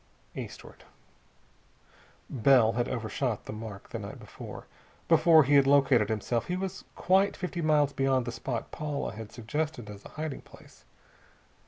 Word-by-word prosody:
Eastward. - - -9 1.4
Bell 125 -2 +4
had 120 +2 -1
overshot 115 0 -2
the - - -6
mark 110 -2 -8
the - - -4
night - - -8
before. - - -10 0.4
Before 160 -2 +6
he 140 +2 +1
had 140 -1 +6
located 135 -6 +4
himself 110 +2 -1
he 180 - -1
was 190 0 -5
quite 195 +2 +2
fifty 180 -2 -4
miles 150 -2 +3
beyond 135 -2 +1
the 120 - -3
spot 120 -1 -4
Paula 150 -2 -3
had 110 0 -9
suggested 120 -1 -4
as 100 -1 -11
a - - -11
hiding 155 -2 -5
place. - - -18
135 Hz, 150 wpm, -29 LUFS, 115-150 Hz, 1.4 s, Before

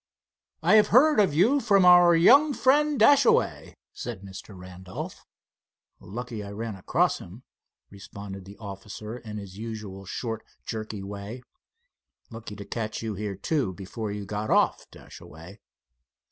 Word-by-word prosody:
"I 220 - +6
have 210 - +5
heard 295 +3 +5
of 195 -6 +4
you 230 - +4
from 200 -7 +3
our 175 -1 +7
young 275 - +6
friend, 285 +3 +3
Dashaway," 285 - +3 0.2
said 115 -6 -7
Mr. 95 0 -10
Randolph. 90 0 -9 0.7
"Lucky 115 +1 -7
I 100 - -8
ran 110 +1 -5
across 95 - 0
him," 105 +9 -12 0.5
responded 100 -1 -9
the 100 +1 -12
officer, 105 +2 -8
in 105 -3 -8
his 100 -1 -9
usual 105 -4 -7
short, 110 +3 -5 0.2
jerky 110 -3 -5
way. 100 +5 -8 0.9
"Lucky 115 -2 -8
to 100 0 -9
catch 110 +1 -4
you 110 -1 -3
here, 100 0 -4
too, 115 - -1
before 100 +3 -6
you 105 0 -5
got 105 +2 -4
off, - - +2
Dashaway." 85 +6 -13
110 Hz, 140 wpm, -26 LUFS, 100-165 Hz, 0.9 s, our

